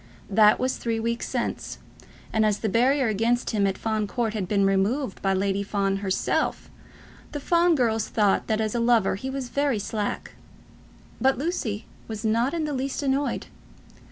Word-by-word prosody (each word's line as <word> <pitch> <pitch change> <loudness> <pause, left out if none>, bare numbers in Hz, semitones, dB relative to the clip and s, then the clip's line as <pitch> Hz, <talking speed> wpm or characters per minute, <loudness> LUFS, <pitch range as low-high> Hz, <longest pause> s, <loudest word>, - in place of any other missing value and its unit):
That 210 +1 +6
was 255 +1 0
three 230 -1 -2
weeks 235 +1 -2
since, - - -3 0.6
and 220 - +3
as 210 -1 +2
the 220 - 0
barrier 260 +5 +3
against 230 +3 +1
him 205 -3 +2
at 195 - -2
Fawn 220 -2 -1
Court 225 +1 -1
had 205 -4 -2
been 200 0 +2
removed 195 +5 0
by 195 -1 +1
Lady 195 +1 0
Fawn 195 -1 0
herself, 195 -1 -1 0.6
the 290 - -3
Fawn 340 +3 +3
girls 225 -5 +1
thought 205 -3 +2
that 220 0 +1
as 215 -1 -1
a 240 - 0
lover 230 -4 +3
he 235 +8 -4
was 265 -2 -4
very 280 -3 +1
slack; 205 0 -3 0.9
but 265 0 +3
Lucy 255 - -2 0.2
was 220 0 -5
not 230 +4 +2
in 335 -2 -2
the 300 -1 -2
least 270 +2 -2
annoyed. 275 +1 0
225 Hz, 175 wpm, -25 LUFS, 205-260 Hz, 0.9 s, That